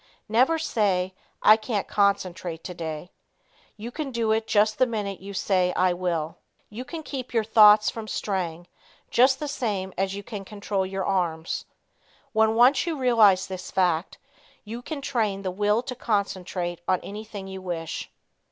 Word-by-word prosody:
Never 255 Hz, +9 st, +3 dB
say 195 Hz, -11 st, 0 dB, 0.3 s
"I 215 Hz, -, +8 dB
can't 215 Hz, -2 st, -2 dB
concentrate 185 Hz, -5 st, 0 dB
today." 165 Hz, -1 st, -6 dB, 0.7 s
You 225 Hz, +3 st, -7 dB
can 300 Hz, +1 st, -4 dB
do 230 Hz, -3 st, 0 dB
it 220 Hz, 0 st, +1 dB
just 215 Hz, +1 st, +2 dB
the 255 Hz, -, +5 dB
minute 205 Hz, -4 st, -3 dB
you 200 Hz, +1 st, -9 dB
say 185 Hz, -1 st, +1 dB
"I 185 Hz, -1 st, +2 dB
will." 170 Hz, -2 st, -2 dB, 0.3 s
You 230 Hz, +4 st, -6 dB
can 320 Hz, +4 st, -7 dB
keep 260 Hz, -4 st, -6 dB
your 225 Hz, -, +3 dB
thoughts 210 Hz, -1 st, +6 dB
from 225 Hz, -1 st, -7 dB
straying, 175 Hz, -6 st, -3 dB, 0.5 s
just 260 Hz, +2 st, +4 dB
the 300 Hz, -, -3 dB
same 210 Hz, -9 st, -2 dB
as 195 Hz, 0 st, 0 dB
you 200 Hz, -, -6 dB
can 205 Hz, -2 st, -7 dB
control 200 Hz, -1 st, -3 dB
your 190 Hz, 0 st, -3 dB
arms. 170 Hz, -4 st, -1 dB, 0.7 s
When 220 Hz, 0 st, +3 dB
once 250 Hz, +6 st, +5 dB
you 325 Hz, -3 st, -1 dB
realize 225 Hz, -8 st, +5 dB
this 185 Hz, -1 st, -7 dB
fact, 175 Hz, -2 st, 0 dB, 0.5 s
you 230 Hz, +3 st, -7 dB
can 290 Hz, +2 st, -6 dB
train 215 Hz, -8 st, -1 dB
the 185 Hz, -, -2 dB
will 210 Hz, +4 st, +1 dB
to 255 Hz, -, -5 dB
concentrate 190 Hz, -6 st, -2 dB
on 185 Hz, -1 st, +2 dB
anything 205 Hz, -1 st, -8 dB
you 190 Hz, 0 st, -7 dB
wish. 170 Hz, -3 st, -4 dB
205 Hz, 160 wpm, -25 LUFS, 185-225 Hz, 0.7 s, I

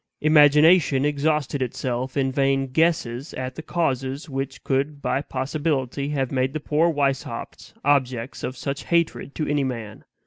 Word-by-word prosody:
Imagination 150 Hz, -1 st, +5 dB
exhausted 150 Hz, -1 st, 0 dB
itself 130 Hz, +1 st, -3 dB
in 135 Hz, -1 st, +1 dB
vain 135 Hz, 0 st, +1 dB
guesses 135 Hz, -2 st, 0 dB
at 130 Hz, 0 st, -4 dB
the 160 Hz, -, -7 dB
causes 135 Hz, -5 st, -2 dB
which 135 Hz, -1 st, -5 dB
could 140 Hz, +1 st, -1 dB
by 140 Hz, -, -1 dB
possibility 140 Hz, 0 st, -2 dB
have 135 Hz, -3 st, -1 dB
made 130 Hz, 0 st, 0 dB
the 155 Hz, -, -2 dB
poor 155 Hz, +3 st, +2 dB
Weishaupts 140 Hz, -3 st, -3 dB
objects 130 Hz, -4 st, 0 dB
of 130 Hz, -, -4 dB
such 140 Hz, +2 st, -4 dB
hatred 170 Hz, -4 st, 0 dB
to 155 Hz, -, -2 dB
any 145 Hz, -1 st, +1 dB
man. 115 Hz, -5 st, -5 dB
140 Hz, 145 wpm, -23 LUFS, 130-150 Hz, -, Imagination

